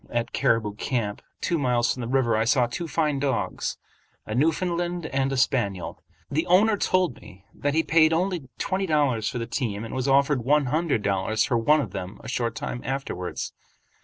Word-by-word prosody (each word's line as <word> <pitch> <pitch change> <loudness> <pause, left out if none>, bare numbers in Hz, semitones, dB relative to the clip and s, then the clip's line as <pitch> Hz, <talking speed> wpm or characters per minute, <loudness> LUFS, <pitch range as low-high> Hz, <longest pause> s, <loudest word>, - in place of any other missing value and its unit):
At 120 0 -2
"Caribou 110 -3 +1
Camp," 105 -2 -2 0.2
two 170 - 0
miles 125 -3 +2
from 125 - -7
the 115 - -3
river, 125 -3 +2
I 110 - +2
saw 125 +2 +3
two 170 +8 -4
fine 150 -3 0
dogs, 135 -4 -1 0.5
a 110 - -5
Newfoundland 175 +5 0
and 135 -2 0
a 135 - -1
spaniel. 110 -8 0 0.3
Their 155 +4 0
owner 205 +5 +5
told 185 -8 +1
me 100 -2 -15
that 145 +1 -1
he 160 - +3
paid 160 -1 +4
only 170 -4 -1
twenty 190 0 -1
dollars 135 -9 +1
for - - -4
the 115 - -2
team 115 -3 -3
and 115 - -7
was 130 +1 -1
offered 140 -1 +3
one 145 +3 +3
hundred 150 -4 0
dollars 100 +2 +1
for 125 -4 +1
one 150 +6 +4
of 110 -9 -5
them 90 +3 -6
a - - -8
short 115 -2 -1
time 120 - -4
afterwards. 130 -9 -4
130 Hz, 190 wpm, -25 LUFS, 115-155 Hz, 0.5 s, owner